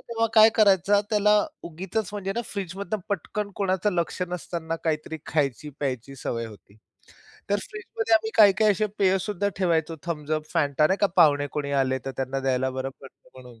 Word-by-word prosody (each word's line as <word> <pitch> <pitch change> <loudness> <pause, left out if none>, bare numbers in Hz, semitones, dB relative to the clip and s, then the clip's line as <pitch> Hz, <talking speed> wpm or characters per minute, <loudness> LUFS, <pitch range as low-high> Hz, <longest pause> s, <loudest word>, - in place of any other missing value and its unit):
तेव्हा 230 -1 -1
काय 220 0 +9
करायचा, 200 -1 +4
त्याला 210 0 +4 0.3
उगीचच 180 +4 -4
म्हणजे 195 -1 -3
ना, - - +1
फ्रिजमधनं 200 +1 -4
पटकन 200 +2 -3
कोणाचं 195 0 0
लक्ष 175 +1 -1
नसतांना 170 -2 -4
काहीतरी 160 0 -2
खायची-प्यायची 140 -2 -2
सवय 115 -3 -3
होती. 105 -1 -15 0.7
तर 205 - +4
फ्रिजमध्ये 425 - -1
आम्ही 220 0 +2
काही-काही 215 0 +6
असे 215 +3 0
पेय 190 -1 +3
सुद्धा 200 0 -1
ठेवायचो, 165 -3 0
थम्स 150 -3 -4
अप, 155 0 0
Fanta 145 +1 +3
नाही 190 - +2
का, 200 - +5
पाहुणे 145 -4 +5
कोणी 145 -1 -3
आले, 130 0 0
तर 135 - -3
त्यांना 135 +1 -2
द्यायला 130 0 0
बरं 130 +1 -4
पडतं 135 - -16
म्हणून. 125 -3 -14
170 Hz, 170 wpm, -25 LUFS, 140-205 Hz, 0.7 s, काय